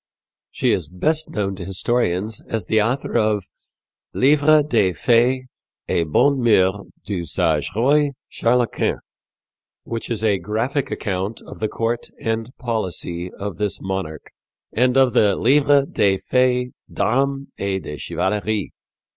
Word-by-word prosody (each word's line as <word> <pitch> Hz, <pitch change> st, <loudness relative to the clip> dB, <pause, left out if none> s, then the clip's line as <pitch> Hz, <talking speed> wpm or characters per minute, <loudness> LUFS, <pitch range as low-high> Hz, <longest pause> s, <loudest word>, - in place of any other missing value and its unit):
She -, -, 0 dB
is 80 Hz, -5 st, -1 dB
best 155 Hz, -, -1 dB
known 100 Hz, -2 st, -2 dB
to 90 Hz, -, -6 dB
historians 100 Hz, +1 st, -1 dB
as 110 Hz, -5 st, -2 dB
the 110 Hz, +3 st, +2 dB
author 125 Hz, +6 st, -1 dB
of 105 Hz, -3 st, +2 dB, 0.7 s
Livre 150 Hz, +2 st, +5 dB
des 110 Hz, -10 st, +2 dB
Fais 120 Hz, -, +2 dB, 0.4 s
et 85 Hz, -, +1 dB
Bonnes 140 Hz, -, +3 dB
Meurs 100 Hz, -4 st, +3 dB, 0.2 s
du 95 Hz, -4 st, -3 dB
sage 80 Hz, -2 st, 0 dB
Roy 145 Hz, +6 st, +3 dB, 0.2 s
Charles 120 Hz, +1 st, +1 dB
V, -, -, +1 dB, 0.9 s
which 115 Hz, -1 st, -5 dB
is 110 Hz, -2 st, -3 dB
a 105 Hz, -3 st, +2 dB
graphic 115 Hz, -, -2 dB
account 100 Hz, +1 st, -3 dB
of -, -, -11 dB
the 110 Hz, -, 0 dB
court 115 Hz, +1 st, -2 dB
and 115 Hz, +1 st, -2 dB
policy 90 Hz, -6 st, -3 dB
of 100 Hz, +1 st, -6 dB
this 105 Hz, -2 st, -1 dB
monarch, 95 Hz, -5 st, -5 dB, 0.4 s
and 125 Hz, +2 st, +2 dB
of 130 Hz, -3 st, +4 dB
the 100 Hz, -2 st, +4 dB
Livre 140 Hz, +2 st, +4 dB
des 100 Hz, -7 st, +2 dB
Faits 125 Hz, +3 st, +1 dB, 0.2 s
d'Armes 135 Hz, +3 st, 0 dB
et 95 Hz, -1 st, -2 dB
de 75 Hz, -, -6 dB
Chevalerie. 105 Hz, +4 st, -2 dB
110 Hz, 140 wpm, -21 LUFS, 95-125 Hz, 0.9 s, Livre